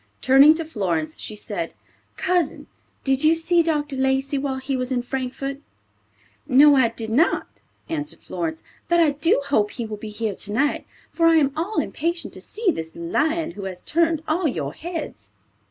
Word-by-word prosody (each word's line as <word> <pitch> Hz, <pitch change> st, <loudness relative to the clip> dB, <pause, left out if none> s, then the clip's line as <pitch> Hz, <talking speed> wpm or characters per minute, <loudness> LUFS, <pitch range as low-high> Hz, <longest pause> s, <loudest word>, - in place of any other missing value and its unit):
Turning 275 Hz, +4 st, +7 dB
to 330 Hz, 0 st, -3 dB
Florence, 170 Hz, -, -2 dB
she 215 Hz, -, -5 dB
said, 205 Hz, -6 st, -4 dB, 0.4 s
"Cousin, 355 Hz, -4 st, 0 dB, 0.4 s
did 270 Hz, 0 st, +1 dB
you 315 Hz, +1 st, +5 dB
see 335 Hz, +1 st, +3 dB
Dr. 300 Hz, -3 st, -1 dB
Lacey 265 Hz, +1 st, +1 dB
while 270 Hz, -1 st, -2 dB
he 265 Hz, +1 st, -3 dB
was 255 Hz, 0 st, -3 dB
in 245 Hz, -1 st, 0 dB
Frankfort?" 270 Hz, +2 st, -4 dB, 0.9 s
"No; 285 Hz, +3 st, +7 dB
I 260 Hz, -3 st, +5 dB
did 225 Hz, -1 st, -4 dB
not," 310 Hz, +10 st, +2 dB, 0.4 s
answered 305 Hz, -2 st, -4 dB
Florence; 320 Hz, -1 st, -4 dB, 0.2 s
"but 345 Hz, 0 st, +3 dB
I 320 Hz, -3 st, +5 dB
do 300 Hz, +2 st, +2 dB
hope 210 Hz, -7 st, +2 dB
he 235 Hz, -, -5 dB
will 215 Hz, -1 st, -6 dB
be 215 Hz, +1 st, -7 dB
here 210 Hz, 0 st, -3 dB
tonight, 220 Hz, +10 st, -1 dB, 0.2 s
for 330 Hz, -1 st, +3 dB
I 330 Hz, -, +6 dB
am 280 Hz, -3 st, +3 dB
all 350 Hz, +8 st, -3 dB
impatient 335 Hz, +3 st, -2 dB
to -, -, -8 dB
see 430 Hz, -4 st, 0 dB
this 160 Hz, -, -6 dB
lion 310 Hz, -, 0 dB
who 195 Hz, +2 st, -8 dB
has 185 Hz, -2 st, -6 dB
turned 330 Hz, -1 st, +1 dB
all 325 Hz, +2 st, +1 dB
your 150 Hz, -, -3 dB
heads." 335 Hz, -, -7 dB
275 Hz, 175 wpm, -23 LUFS, 225-325 Hz, 0.9 s, Turning